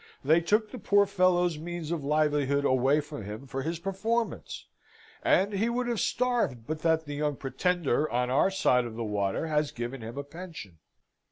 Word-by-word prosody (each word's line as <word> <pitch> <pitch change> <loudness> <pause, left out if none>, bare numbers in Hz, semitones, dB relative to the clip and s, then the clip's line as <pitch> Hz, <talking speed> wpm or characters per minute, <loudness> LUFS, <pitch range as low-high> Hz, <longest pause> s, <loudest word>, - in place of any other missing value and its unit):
They 160 +5 +4
took 210 +5 +1
the 255 - -7
poor 200 0 +4
fellow's 180 -4 +2
means 170 -1 -5
of 165 -4 -2
livelihood 145 -1 +1
away 135 +3 +3
from 145 -5 -8
him 105 +6 -7
for 135 0 -4
his 165 +4 -2
performance; 195 +6 -2 0.6
and 200 +2 +3
he 210 +4 +1
would 245 +1 -1
have 235 -3 -1
starved, 230 - 0
but 155 +3 -3
that 160 0 +1
the 145 - -6
young 145 0 -1
Pretender 150 +1 0
on 125 +1 0
our 140 +8 +4
side 125 -10 +2
of 115 -2 -7
the 115 - -3
water 105 +4 -1
has 150 -2 +1
given 120 +2 -5
him 115 +4 -7
a 140 - -3
pension." 150 - -10
155 Hz, 185 wpm, -28 LUFS, 135-185 Hz, 0.6 s, They